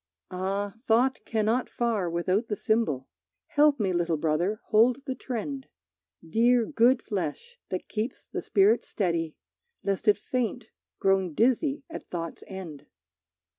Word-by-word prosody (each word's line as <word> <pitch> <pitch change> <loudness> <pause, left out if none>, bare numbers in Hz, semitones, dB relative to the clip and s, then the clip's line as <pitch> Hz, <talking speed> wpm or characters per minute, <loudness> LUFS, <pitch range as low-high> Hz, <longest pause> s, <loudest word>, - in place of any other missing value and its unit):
Ah, 195 +2 -2
thought 250 +4 +3
cannot 225 +3 +1
far 225 -7 0
without 185 +6 0
the 210 - -1
symbol! 205 - 0 0.4
Help 295 -1 +4
me, 195 -3 +1
little 170 -2 +1
brother, 165 +7 0
hold 245 +5 +4
the 265 - -2
trend. 265 +2 -5 0.6
Dear 235 +6 +4
good 250 -1 +3
flesh, 205 - -4
that 185 - -4
keeps 220 +4 -4
the - - -5
spirit 205 +4 +3
steady, 170 -5 -1 0.5
Lest 200 +3 -1
it 210 - +6
faint, 240 +1 -2 0.3
grown 190 -4 +1
dizzy 265 +5 +2
at 325 - -9
thought's 165 -2 -5
end! 180 -7 -8
215 Hz, 130 wpm, -27 LUFS, 185-245 Hz, 0.6 s, it